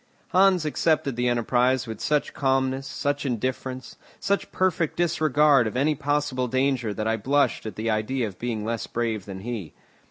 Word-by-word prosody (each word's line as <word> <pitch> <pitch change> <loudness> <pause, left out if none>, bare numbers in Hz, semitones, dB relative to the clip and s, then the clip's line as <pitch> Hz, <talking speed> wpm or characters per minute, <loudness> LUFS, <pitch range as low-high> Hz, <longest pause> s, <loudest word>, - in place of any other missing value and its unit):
Hans 185 -3 +4
accepted 150 -3 +1
the 125 +1 0
enterprise 125 +2 +2
with 110 -2 -7
such 150 -1 0
calmness, 135 0 0
such 140 +2 -2
indifference, 130 0 -3 0.2
such 200 0 -1
perfect 175 -4 0
disregard 150 -6 +3
of 110 - -4
any 145 +4 +2
possible 145 -3 -1
danger 130 -2 0
that 110 +1 -3
I 110 0 +1
blushed 140 +1 +1
at 105 - -6
the 110 +1 -1
idea 115 +4 -1
of 95 -3 -10
being 115 -3 -3
less 115 0 -3
brave 115 -4 -2
than 95 -2 -7
he. 110 -7 -5
130 Hz, 165 wpm, -25 LUFS, 115-145 Hz, 0.2 s, Hans